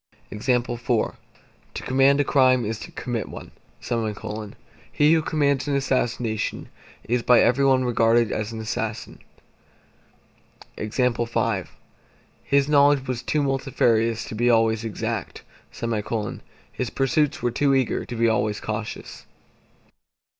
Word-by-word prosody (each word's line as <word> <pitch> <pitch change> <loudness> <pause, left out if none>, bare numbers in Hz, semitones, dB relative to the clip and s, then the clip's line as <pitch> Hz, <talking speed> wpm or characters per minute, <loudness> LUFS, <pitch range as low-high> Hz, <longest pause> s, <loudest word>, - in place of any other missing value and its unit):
To 120 0 0 0.7
command 135 +2 +3
a - - +4
crime 130 -4 +3
is 110 +1 -3
to - - -8
commit 120 -3 -4
one; - - -10 1.4
he 150 +2 +4
who 160 - +3
commands 145 -3 0
an 145 - 0
assassination, 125 -5 -1 0.3
is 120 +1 0
by 120 0 +5
every 125 +3 +3
one 130 -2 +3
regarded 115 -1 +3
as 110 0 -3
an 115 - -6
assassin. 110 0 -4 1.6
His 105 -1 -6
knowledge 115 -5 0 1.4
was 125 -2 -2
too 150 -1 0
multifarious 115 -4 +1
to - - -8
be 120 +3 +1
always 115 -1 +3
exact; 110 -3 -4 0.3
his 115 +2 -5
pursuits 150 +4 0
were 120 - +1
too 140 +3 +2
eager 130 -3 0
to 120 - -7
be 115 0 +2
always 110 -2 0
cautious. 110 0 -6
120 Hz, 115 wpm, -24 LUFS, 115-135 Hz, 1.6 s, by